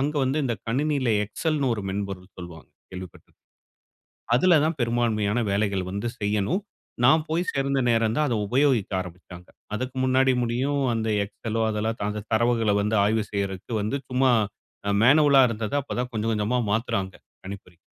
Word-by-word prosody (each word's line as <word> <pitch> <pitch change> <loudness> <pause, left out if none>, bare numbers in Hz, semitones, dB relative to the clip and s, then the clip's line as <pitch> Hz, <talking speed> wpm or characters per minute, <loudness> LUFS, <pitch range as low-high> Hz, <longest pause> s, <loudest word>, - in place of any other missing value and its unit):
அங்க 145 +3 -1
வந்து, 135 +3 0
இந்த 120 -3 0
கணினியில 135 +1 0
எக்ஸெல்ன்னு 140 +5 -1
ஒரு 105 - -5
மென்பொருள் 95 -2 -5
சொல்வாங்க. 85 -3 -10 0.2
கேள்விப்பட்டு 90 -1 -10 1.1
அதுல 175 +8 +4
தான் 160 +1 +1
பெரும்பான்மையான 115 -2 +1
வேலைகள் 100 -1 0
வந்து 100 +4 -3
செய்யணும். 105 - 0 0.4
நான் 155 +5 +5
போய் 165 +2 +1
சேர்ந்த 140 0 0
நேரம் 115 -1 +2
தான், 150 0 +2
அதை 120 -4 0
உபயோகிக்க 130 -2 +2
ஆரம்பிச்சாங்க. 90 0 -11 0.3
அதுக்கு 130 +3 -4
முன்னாடி 130 0 +3
முடியும், 130 +5 0
அந்த 110 -1 -1 0.2
எக்ஸெலோ 115 +2 -4
அதெல்லாம் 110 0 -2
அந்த 105 0 -5
தரவுகளை 115 -2 +2
வந்து 105 +2 0
ஆய்வு 110 +1 +1
செய்றதுக்கு 100 +2 -3
வந்து 110 +7 -1
சும்மா 130 0 +3 0.6
அ - - +2
மேனுவலா 140 +2 +6
இருந்தத 110 -2 -4
அப்ப 140 - -7
தான் 125 0 -2
கொஞ்சம் 110 +1 -1
கொஞ்சமா 110 +4 0
மாத்துறாங்க 100 -4 -1 0.3
கணிப்பொறில. 95 -3 -9
115 Hz, 150 wpm, -25 LUFS, 100-130 Hz, 1.1 s, மேனுவலா